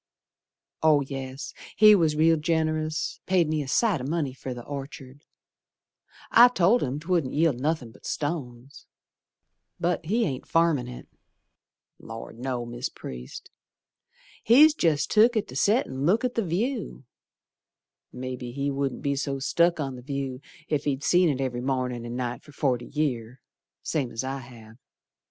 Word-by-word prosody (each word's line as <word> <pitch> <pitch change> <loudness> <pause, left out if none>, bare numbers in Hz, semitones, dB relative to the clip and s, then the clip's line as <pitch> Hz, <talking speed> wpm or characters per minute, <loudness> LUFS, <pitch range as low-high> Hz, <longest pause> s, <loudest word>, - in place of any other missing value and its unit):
Oh, 155 -2 +5
yes, 135 0 -6 0.2
he 215 0 +8
was 165 -6 +3
real 165 +2 +4
generous, 155 -1 -1
Paid 180 -3 +3
me 155 -1 0
a 140 - -6
sight 190 - +2
o' - - -5
money 145 -1 -1
fer 130 0 -7
the 120 -1 -6
Orchard; 140 -1 -8 1.1
I 240 +2 +9
told 230 0 +3
him 135 +2 -2
'twouldn't 165 -5 -1
yield 150 -5 +2
nothin' 145 -4 -1
but - - -12
stones, 140 -3 -5 0.9
But 175 0 0
he 225 +5 +2
ain't 135 -5 -4
farmin' 165 -7 +2
it. 125 0 -9 0.9
Lor', 115 0 -9
no, 125 0 -4
Mis' 120 +1 -4
Priest, 60 0 -9 0.9
He's 295 +7 +7
jest 160 - +1
took 225 +2 +5
it 215 - -1
to - - -9
set 220 +6 +3
and 130 +1 -5
look 210 - +3
at 250 - -1
the 230 - 0
view. 210 - -2 1.1
Mebbe 130 0 -6
he 140 0 -1
wouldn't 135 -2 -3
be 140 0 0
so 140 0 -2
stuck 170 +5 +2
on 135 -3 -3
the - - -10
view 135 -1 -4 0.3
Ef 150 -2 -1
he'd 140 -1 -1
seed 180 -1 +4
it 135 -3 -1
every 125 -2 -2
mornin' 125 -2 -2
and 120 +1 -5
night 125 -1 -3
for 150 - -17
forty 125 -4 -1
year 130 -5 -2 0.4
Same's 140 -6 -2
as 115 - -3
I 135 +1 -3
have. 115 -3 -14
140 Hz, 160 wpm, -26 LUFS, 130-165 Hz, 1.1 s, I